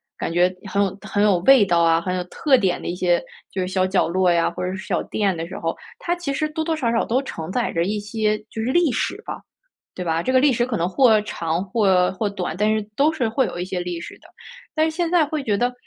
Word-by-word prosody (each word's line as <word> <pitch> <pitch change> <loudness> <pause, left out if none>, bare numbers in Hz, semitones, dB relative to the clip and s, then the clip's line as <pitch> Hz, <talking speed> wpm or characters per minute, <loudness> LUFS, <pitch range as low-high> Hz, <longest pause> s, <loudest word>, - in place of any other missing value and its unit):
感 - - -4
觉 180 +2 +3 0.2
很 200 +1 +2
有 195 -1 -2
很 205 - -1
有 205 -3 +4
味 240 +3 +6
道 175 -3 +2
啊、 165 0 +4
很 180 +2 -3
有 180 - -2
特 275 - +2
点 190 -8 +1
的 - - -7
一 175 - -2
些， 175 -1 +2 0.3
就 190 - -4
是 180 - -1
小 185 0 +1
角 190 -3 +2
落 180 +1 +2
呀， 170 -1 +2
或 - - -5
者 180 - -2
是 190 - -8
小 - - 0
店 200 -3 -1
的 165 0 -5
时 - - -7
候， 165 0 -2 0.2
它 345 - -1
其 350 -5 -4
实 305 +3 -1
多 315 +1 -3
多 325 0 -1
少 250 -7 0
少 230 - +1
都 245 +3 +1
承 165 -10 -6
载 240 +3 -1
着 165 - +1
一 210 +4 -1
些 215 +1 -1
就 225 - -6
是 - - -2
历 340 -1 +3
史 230 - -2
吧， - - -6 0.5
对 180 - -5
吧？ 165 0 0
这 255 - -1
个 260 - +5
历 275 0 +4
史 240 +1 0
可 235 -4 -2
能 170 - 0
或 220 +2 +4
长 170 -4 -2
或， 190 -3 +2
或 205 +2 -1
短， 185 -5 -4
但 210 +3 +2
是 215 - -1
都 290 +5 +3
是 265 -7 -1
会 250 +4 +1
有 - - -6
一 180 - -2
些 185 -1 -3
历 175 -1 -4
史 170 - -8
的。 - - -19 0.5
但 310 0 +3
是 315 - -8
现 345 -1 0
在 340 -2 +4
会 305 0 -3
觉 210 -5 0
得， 245 +3 0
205 Hz, 300 characters per minute, -22 LUFS, 180-255 Hz, 0.5 s, 味